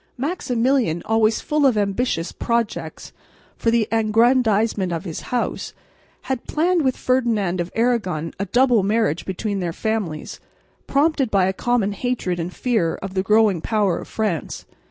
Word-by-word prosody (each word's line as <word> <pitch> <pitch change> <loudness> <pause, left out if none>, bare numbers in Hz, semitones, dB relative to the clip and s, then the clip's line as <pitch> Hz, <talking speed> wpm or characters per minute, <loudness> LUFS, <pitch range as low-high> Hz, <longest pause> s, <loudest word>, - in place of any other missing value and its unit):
Maximilian, 250 - 0
always 220 0 +2
full 300 -1 0
of 260 -5 +4
ambitious 200 -3 -1
projects 235 -2 -3 0.4
for 230 - 0
the 230 -2 +2
aggrandisement 225 -3 +2
of 170 +2 -3
his 165 -4 -5
House, 245 -1 -2 0.5
had 265 -3 -4
planned 345 +3 +1
with 260 -3 0
Ferdinand 220 -8 +1
of 175 - -5
Aragon 200 -10 0
a 200 - -1
double 245 +1 +3
marriage 205 -4 0
between 200 +2 -3
their 175 -2 -2
families, 200 -9 -3 0.5
prompted 280 -2 +2
by 195 -3 +3
a 190 - 0
common 235 -1 0
hatred 200 -5 -2
and 170 +2 -3
fear 220 -7 0
of 195 -1 -7
the 190 - +1
growing 210 -3 +3
power 205 -5 +1
of - - -9
France. 210 -8 -3
220 Hz, 150 wpm, -21 LUFS, 190-245 Hz, 0.5 s, of